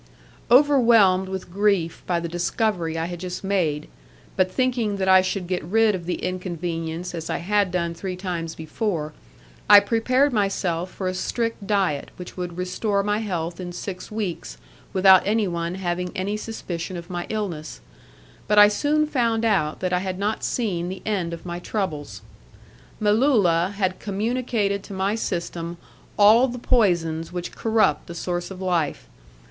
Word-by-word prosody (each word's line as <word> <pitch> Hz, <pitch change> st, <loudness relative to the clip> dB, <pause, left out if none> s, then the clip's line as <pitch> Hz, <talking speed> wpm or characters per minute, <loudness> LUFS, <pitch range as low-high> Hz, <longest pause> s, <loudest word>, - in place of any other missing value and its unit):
Overwhelmed 235 Hz, -8 st, +5 dB
with 190 Hz, -2 st, -6 dB
grief 200 Hz, -5 st, +1 dB
by 175 Hz, -2 st, +1 dB
the 170 Hz, -, -4 dB
discovery 175 Hz, -1 st, -1 dB
I 165 Hz, -, -1 dB
had 175 Hz, 0 st, -6 dB
just 180 Hz, +1 st, -5 dB
made, 170 Hz, -7 st, 0 dB, 0.5 s
but 185 Hz, -1 st, +2 dB
thinking 240 Hz, -4 st, 0 dB
that 190 Hz, -1 st, -1 dB
I 190 Hz, 0 st, +7 dB
should 185 Hz, 0 st, -2 dB
get 180 Hz, -1 st, -2 dB
rid 215 Hz, +5 st, +3 dB
of 175 Hz, -3 st, -5 dB
the 180 Hz, -, 0 dB
inconvenience 175 Hz, -2 st, -4 dB
as 165 Hz, -2 st, -5 dB
I -, -, 0 dB
had 205 Hz, +2 st, +1 dB
done 170 Hz, -2 st, -1 dB
three 185 Hz, +2 st, -5 dB
times 175 Hz, -3 st, -4 dB
before, 160 Hz, -1 st, -3 dB, 0.6 s
I 205 Hz, -, +11 dB
prepared 255 Hz, +6 st, +2 dB
myself 190 Hz, -4 st, 0 dB
for 185 Hz, 0 st, -5 dB
a 185 Hz, -, -1 dB
strict 230 Hz, +2 st, -2 dB
diet, 190 Hz, -8 st, 0 dB
which 180 Hz, -, -9 dB
would 180 Hz, -1 st, -5 dB
restore 200 Hz, +3 st, -1 dB
my 210 Hz, +1 st, 0 dB
health 175 Hz, -5 st, -3 dB
in 180 Hz, -1 st, -5 dB
six 180 Hz, +1 st, -6 dB
weeks 210 Hz, -5 st, -4 dB, 0.3 s
without 190 Hz, -1 st, +7 dB
anyone 180 Hz, -5 st, 0 dB
having 180 Hz, -1 st, -2 dB
any 200 Hz, +2 st, -2 dB
suspicion 185 Hz, -5 st, -5 dB
of 170 Hz, +2 st, -9 dB
my 175 Hz, -1 st, -4 dB
illness, 180 Hz, -, -4 dB, 0.7 s
but 210 Hz, -, +2 dB
I 205 Hz, 0 st, +9 dB
soon 295 Hz, +8 st, +1 dB
found 230 Hz, -6 st, 0 dB
out 155 Hz, -9 st, +1 dB
that 185 Hz, -1 st, -1 dB
I 180 Hz, -, +3 dB
had 185 Hz, 0 st, -3 dB
not 205 Hz, +3 st, -2 dB
seen 180 Hz, -8 st, -1 dB
the 185 Hz, 0 st, -7 dB
end 190 Hz, -6 st, -1 dB
of 170 Hz, 0 st, -8 dB
my 175 Hz, 0 st, -4 dB
troubles; 175 Hz, -7 st, -4 dB, 0.8 s
Melulla 205 Hz, -6 st, +3 dB
had 185 Hz, -2 st, 0 dB
communicated 210 Hz, -1 st, -1 dB
to 200 Hz, -, -9 dB
my 190 Hz, +2 st, 0 dB
system 170 Hz, -5 st, -3 dB, 0.4 s
all 220 Hz, +5 st, +7 dB
the 245 Hz, -1 st, -5 dB
poisons 170 Hz, -9 st, +1 dB
which 175 Hz, -1 st, -5 dB
corrupt 225 Hz, -1 st, +1 dB
the 170 Hz, -, -8 dB
source 175 Hz, 0 st, -3 dB
of 190 Hz, -1 st, -9 dB
life. 170 Hz, -, -1 dB
185 Hz, 165 wpm, -23 LUFS, 175-210 Hz, 0.8 s, I